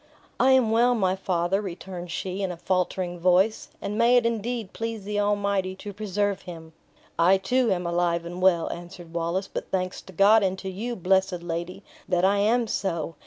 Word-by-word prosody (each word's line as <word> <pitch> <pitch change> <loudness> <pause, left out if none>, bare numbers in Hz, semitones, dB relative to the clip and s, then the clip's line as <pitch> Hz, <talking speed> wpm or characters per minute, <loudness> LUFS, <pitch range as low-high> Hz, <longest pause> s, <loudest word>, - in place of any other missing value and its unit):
"I 265 +1 +5
am 250 -4 +4
well, 240 +2 +4
my 190 -4 +1
father," 185 0 0
returned 180 -2 -7
she, 185 +3 -4
in 190 -2 -1
a 175 - -7
faltering 180 0 -1
voice; 185 +5 +2
"and 210 +2 -4
may 240 +2 +5
it 240 - +2
indeed 230 -2 -2
please 225 -2 -4
the 205 +1 -2
Almighty 200 -2 0
to 205 +2 -8
preserve 205 -1 -1
him!" 165 -2 -10 0.5
"I, 180 +3 +5
too, 235 +4 +1
am 180 -2 -1
alive 170 0 0
and 175 +2 -6
well," 180 -3 +3
answered 175 -1 -11
Wallace; 170 +3 -1
"but - - -6
thanks 185 -1 -2
to 190 - -14
God, 205 +5 +6
and 190 -1 0
to 190 0 -5
you, 230 +6 -4
blessed 190 -2 +1
lady, 175 +3 -5 0.3
that 180 0 +2
I 200 +1 +3
am 230 +4 +2
so! 170 -6 -2
190 Hz, 190 wpm, -25 LUFS, 175-210 Hz, 0.5 s, God